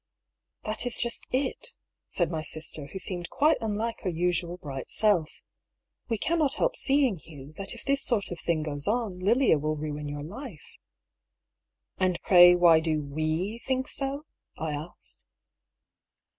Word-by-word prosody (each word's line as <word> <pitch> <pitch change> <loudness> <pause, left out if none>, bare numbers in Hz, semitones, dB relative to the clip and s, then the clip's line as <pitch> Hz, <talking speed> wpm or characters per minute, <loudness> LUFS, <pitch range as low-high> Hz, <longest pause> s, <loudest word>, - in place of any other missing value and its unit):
" - - -58
That 215 +3 -1
is 245 - 0
just 235 -1 -2
tV," 265 +1 0 0.6
said 175 -1 +2
my 160 -2 -2
sister, 155 -2 +1
who 190 - -8
seemed 180 -2 -3
quite 305 +3 +3
unlike 225 +1 -2
her 190 - -2
usual 175 0 -1
bright 135 -6 -7
self. 195 -8 +2 0.4
" - - -57
We 225 - 0
cannot 310 +3 +1
help - - 0
seeing, 270 -7 +2
Hugh, 150 -2 -13
that 195 +3 -4
if 235 - -11
this 275 0 +2
sort 215 -7 +3
of 175 - -5
thing 160 -2 -1
goes 145 -2 -4
on, 215 -4 -1
Lilia 220 - +3
will 155 +1 -1
ruin 150 -1 -5
your 145 0 -5
life." 200 - -9 0.6
" - - -59
And 185 -2 +1
pray 175 -1 +8
why 170 -2 +6
do 160 -1 0
we 155 +9 -2
think 260 +2 -2
so? 275 +2 -3 0.2
" - - -60
I 160 -1 -3
asked. 150 +4 -8
180 Hz, 170 wpm, -27 LUFS, 155-235 Hz, 0.6 s, pray